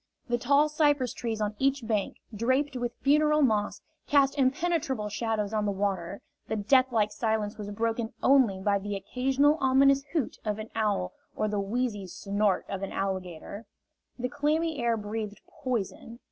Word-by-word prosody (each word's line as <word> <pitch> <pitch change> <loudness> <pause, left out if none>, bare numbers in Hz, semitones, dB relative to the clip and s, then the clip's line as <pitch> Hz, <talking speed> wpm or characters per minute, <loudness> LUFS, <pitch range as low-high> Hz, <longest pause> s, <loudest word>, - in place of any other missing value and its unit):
The 240 0 +1
tall 280 +5 +4
cypress 290 -5 +2
trees 225 -4 -3
on 210 0 -1
each 270 -2 +1
bank, 215 -3 -1 0.2
draped 260 +6 +1
with 245 -1 -3
funeral 300 +2 +4
moss, 215 -5 +1 0.3
cast 280 -1 +4
impenetrable 275 -4 0
shadows 215 -1 -2
on 215 -1 +1
the - - +1
water; 195 -2 -2 0.2
the - - -2
deathlike 225 0 +3
silence 220 -1 -1
was 205 -1 -5
broken 225 +2 -2
only 255 -8 +4
by 200 +1 +1
the 205 +1 -4
occasional 270 +9 +1
ominous 275 +1 +4
hoot 310 -7 -1
of 210 -1 -2
an 215 +1 -7
owl 210 - 0 0.2
or 215 - 0
the 210 -1 -1
wheezy 210 -1 -2
snort 200 +1 0
of 195 -1 -4
an 195 - -4
alligator; 190 +2 -4 0.5
the 250 0 -2
clammy 305 +3 0
air 235 -1 +2
breathed 210 0 -5
poison. 235 -1 -4
225 Hz, 160 wpm, -28 LUFS, 205-270 Hz, 0.5 s, tall